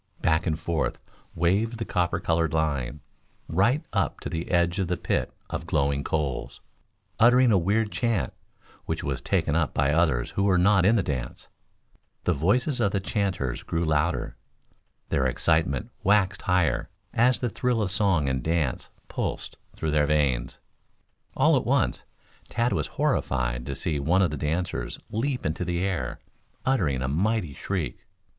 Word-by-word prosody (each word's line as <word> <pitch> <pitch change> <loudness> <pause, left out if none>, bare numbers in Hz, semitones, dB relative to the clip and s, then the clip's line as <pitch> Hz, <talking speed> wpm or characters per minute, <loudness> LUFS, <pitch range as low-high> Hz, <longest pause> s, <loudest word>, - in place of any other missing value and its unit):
Back 80 -2 +1
and 80 -1 0
forth 85 -2 -1 0.4
waved 100 +8 +1
the 115 - -3
copper 90 -1 0
colored 80 -2 0
line, 75 -3 -1 0.5
right 115 - +2
up - - 0
to - - -4
the 80 +1 -4
edge 85 +1 +2
of 95 - 0
the 90 0 -1
pit - - -1 0.2
of 80 +2 -4
glowing 70 -3 +1
coals, 75 -5 -2 0.6
uttering 125 +1 +6
a 100 - +5
weird 105 +5 +1
chant, 115 -5 0 0.5
which - - -3
was 70 -1 -2
taken 80 -2 0
up 80 -2 0
by 70 +1 +2
others 80 -7 +2
who - - -1
were 95 -2 +4
not 95 +1 +4
in 110 - +5
the 100 - +2
dance. 65 -6 -4 0.7
The 90 - +2
voices 120 - +1
of 100 -3 +2
the 100 - +2
chanters 90 - -2
grew 85 0 -2
louder, 80 +2 0 0.7
their 65 - +2
excitement 75 -1 +1
waxed 100 -1 +3
higher, 90 -7 +1 0.2
as 125 +2 +3
the 125 - 0
thrill 125 0 0
of 100 -4 0
song 95 -7 +2
and 65 -1 0
dance 80 -3 -1 0.2
pulsed - - -4 0.2
through 80 -1 -2
their 75 -1 +3
veins. 70 -5 +1 0.8
All - - +5
at - - +1
once, - - +1 0.4
Tad 120 +1 +1
was 75 - -1
horrified - - 0
to 70 - -3
see 75 +1 -2
one 90 +7 +3
of 85 - +1
the - - -2
dancers 80 +5 -2
leap 125 +3 -1
into 80 +3 -1
the 90 0 -1
air, 80 -11 -2 0.5
uttering 85 - +1
a - - -1
mighty 90 +2 0
shriek. 90 +2 -3
85 Hz, 165 wpm, -26 LUFS, 75-100 Hz, 0.8 s, uttering